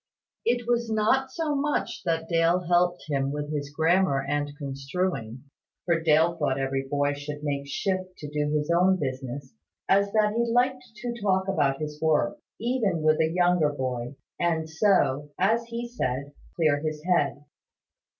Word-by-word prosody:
It 240 0 +1
was 240 -1 +1
not 225 +5 +2
so 315 0 -1
much 290 +1 -1
that 165 -1 0
Dale 170 +1 +3
helped 175 0 +2
him 135 -2 0
with 150 +1 -4
his 145 -1 -3
grammar 160 -1 +2
and 145 0 0
construing 140 -3 -3 0.4
(for 170 -2 +2
Dale 160 +1 +4
thought 145 -5 0
every 135 0 -1
boy 145 0 +1
should 145 +1 -7
make 140 -1 -2
shift 185 +5 -2
to 150 - -7
do 150 0 -1
his 150 +1 0
own 185 +2 +4
business) 130 0 -4 0.3
as 200 +1 +3
that 210 -1 +3
he 235 0 +1
liked 255 +2 +2
to 235 +3 -4
talk 190 -2 +1
about 145 -8 +1
his 150 -1 -5
work, 160 - +1 0.2
even 220 -9 0
with 155 0 +4
a 160 - +3
younger 175 -3 +3
boy; 125 -2 -3 0.2
and 165 -2 0
so, 160 -5 +2
as 225 +5 +2
he 235 +1 -5
said, 140 - -3 0.2
clear 155 -4 +2
his 155 0 -4
head. 145 -5 +1
160 Hz, 160 wpm, -26 LUFS, 145-195 Hz, 0.4 s, Dale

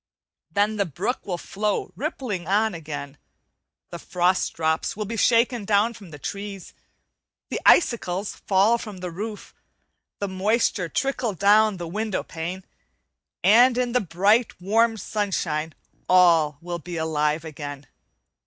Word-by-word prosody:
Then 210 +1 +1
the 200 -2 0
brook 190 - -3
will 180 -3 -2
flow 205 +4 -2
rippling 245 - -4
on 210 +2 +2
again; 150 -3 -7 0.7
the - - -6
frost 180 +1 +1
drops 160 +3 -1
will 210 - -2
be 230 +3 -5
shaken 235 +1 +3
down 210 +3 +2
from 200 -6 -13
the 150 - -10
trees, 200 +4 -7 0.8
the - - -2
icicles 205 - +3
fall 205 +4 +4
from 210 -4 -8
the 180 -1 -6
roof, 210 +4 -7 0.6
the 200 - -3
moisture 190 -1 0
trickle 260 -3 -1
down 205 +2 +4
the 175 -1 -5
window 210 +3 -2
pane, 175 +4 -6 0.8
and 240 +4 +6
in 250 -1 0
the 250 - +2
bright, 200 +6 +2
warm 225 +5 +2
sunshine 175 -7 -2 0.3
all 165 -5 +5
will 175 0 -5
be 175 +1 -7
alive 155 0 0
again. 145 -2 -7
195 Hz, 135 wpm, -24 LUFS, 170-220 Hz, 0.8 s, and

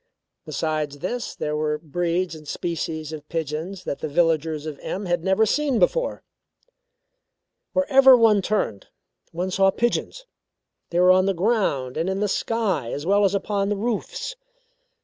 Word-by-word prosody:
Besides 155 -3 -2
this, 230 - -4
there 150 0 -2
were 150 0 0
breeds 170 +3 -2
and 155 -1 -11
species 160 -1 -4
of 150 -1 -9
pigeons 165 +4 -4
that 140 - -4
the - - -3
villagers 160 -1 +1
of 150 -3 -6
M 200 +2 -4
had 175 -2 -1
never 190 +3 +3
seen 275 +3 +1
before. - - +1 1.5
Wherever 270 -2 +6
one 220 -3 +5
turned, 190 - -2 0.4
one 180 +3 -3
saw 195 +1 +4
pigeons. 240 - -1 0.6
They 170 - 0
were 180 +1 +6
on 185 +1 +4
the 195 - +1
ground 170 - 0
and 165 +4 0
in 190 0 -1
the 210 - +1
sky, 205 - -1
as 145 - -4
well 200 +2 +4
as 195 +1 +2
upon 200 0 -1
the 210 - -1
roofs. 235 - -3
180 Hz, 155 wpm, -23 LUFS, 155-210 Hz, 1.5 s, Wherever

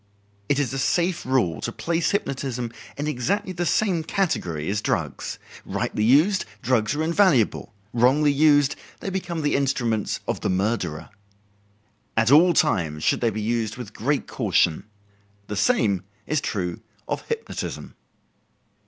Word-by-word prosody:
It 145 - +3
is 140 -4 0
a 135 - -2
safe 175 +2 0
rule 125 -11 +1
to 115 - -3
place 165 +6 -1
hypnotism 130 - -2 0.2
in 145 - -2
exactly 155 +8 -1
the 175 0 -2
same 185 -5 +1
category 90 - -1
as 105 +2 -1
drugs. - - -2 0.3
Rightly 105 +2 -2
used, 155 - +4 0.2
drugs 120 0 +1
are 155 - 0
invaluable; 160 - +2 0.2
wrongly 135 +5 +4
used, 145 -1 +4 0.2
they 195 - -4
become 175 -4 -3
the 145 - +1
instruments 120 -6 0
of - - -2
the - - -1
murderer. 95 -4 -1 1.1
At 115 +2 +3
all 170 +5 +7
times 80 - +1
should - - +2
they 120 - +3
be 110 0 -4
used 115 0 -1
with 115 -4 -8
great 140 +5 -1
caution. 90 -8 +1 0.6
The 105 - -5
same 105 - +2 0.2
is 155 -1 0
true 90 -9 -3 0.3
of - - -2
hypnotism. 460 -1 -5
130 Hz, 145 wpm, -24 LUFS, 110-160 Hz, 1.1 s, all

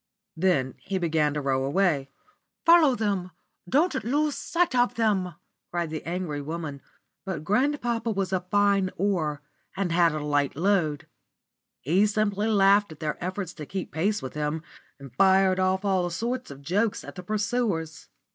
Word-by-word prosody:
Then 160 -7 +1
he 195 - -3
began 155 -4 +1
to 150 - -1
row 135 -1 0
away. 145 -2 +1 0.6
"Follow 330 -6 +6
them! 200 -4 -1 0.4
Don't 295 - +2
lose 295 +5 +1
sight 340 0 0
of 245 0 +2
them!" 195 -7 0 0.3
cried 170 -2 -2
the 155 - -5
angry 170 -4 -3
woman; 150 -2 -5 0.4
but 190 -6 -4
grandpapa 240 - 0
was 195 -3 -1
a 185 - +2
fine 200 +1 +2
oar 165 -7 0 0.4
and 195 -3 -1
had 170 -1 +4
a 150 -1 -3
light 145 -2 +1
load. 160 -4 +1 0.8
He 185 +9 +3
simply 210 0 0
laughed 200 -2 +4
at 155 - -11
their 155 +2 -3
efforts 185 -1 -4
to 150 -3 -9
keep 190 -1 -5
pace 200 +6 0
with 130 - -6
him, 150 +1 -2 0.4
and 135 -3 -11
fired 190 -1 +4
off 190 +1 +1
all 185 -3 +1
sorts 240 +8 -3
of 140 0 -11
jokes 205 +8 0
at - - -9
the 180 - -8
pursuers. 200 -6 -2
185 Hz, 160 wpm, -26 LUFS, 155-205 Hz, 0.8 s, Follow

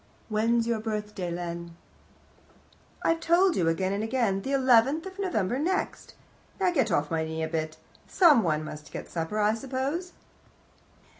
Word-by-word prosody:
"When's 225 +2 +2
your 230 -1 0
birthday, 210 -4 -4
Len?" 170 -1 -5 1.3
"I've 330 0 +2
told 345 +2 +3
you 170 - +1
again 185 +4 0
and 205 +2 -2
again, 225 -4 0
the 270 - -4
eleventh 265 +3 +4
of 380 +1 -9
November 250 - 0
next. 370 +6 -2 0.4
Now 375 -2 +3
get 265 - +1
off 150 -2 0
my 160 -1 0
knee 160 0 -3
a - - -1
bit; 155 -1 -3 0.3
someone 220 - +4
must 150 0 -9
get - - -6
supper, 165 +5 -3
I 210 +1 +3
suppose." 275 +9 -3
220 Hz, 150 wpm, -27 LUFS, 170-275 Hz, 1.3 s, eleventh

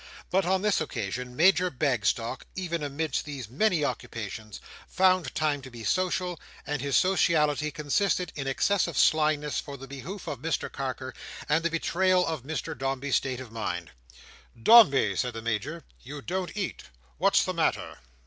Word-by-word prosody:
But 185 -1 +2
on 190 +1 +1
this 210 -5 +2
occasion, 125 -2 -4
Major 180 +3 +4
Bagstock, 125 - -1
even 170 -3 -3
amidst 145 0 -2
these 140 -6 -6
many 160 - +1
occupations, 110 -4 -5 0.3
found 185 -7 +2
time 150 -2 0
to 130 - -10
be 120 -2 -10
social; 180 - 0 0.3
and 150 -2 -2
his 140 -1 +2
sociality 155 -5 +2
consisted 175 +5 0
in 140 -2 -4
excessive 170 +4 +1
slyness 150 -2 +3
for 140 -1 -7
the 135 +1 -10
behoof 140 +9 -7
of 140 - -5
Mr 160 +4 -2
Carker, 130 -1 -4 0.3
and 160 +2 +2
the 170 - +2
betrayal 180 +2 +2
of 160 -4 -3
Mr 155 +5 -4
Dombey's 135 +1 0
state 130 -2 -3
of 130 -4 -9
mind. 90 -7 -4 0.7
"Dombey," 140 - +7
said 125 +5 -1
the 115 - -5
Major, 115 +9 -3 0.2
"you 140 +2 -8
don't 185 +1 -3
eat; 200 -3 -4 0.3
what's - - +4
the - - -2
matter?" - - -1
150 Hz, 160 wpm, -28 LUFS, 130-175 Hz, 0.7 s, Dombey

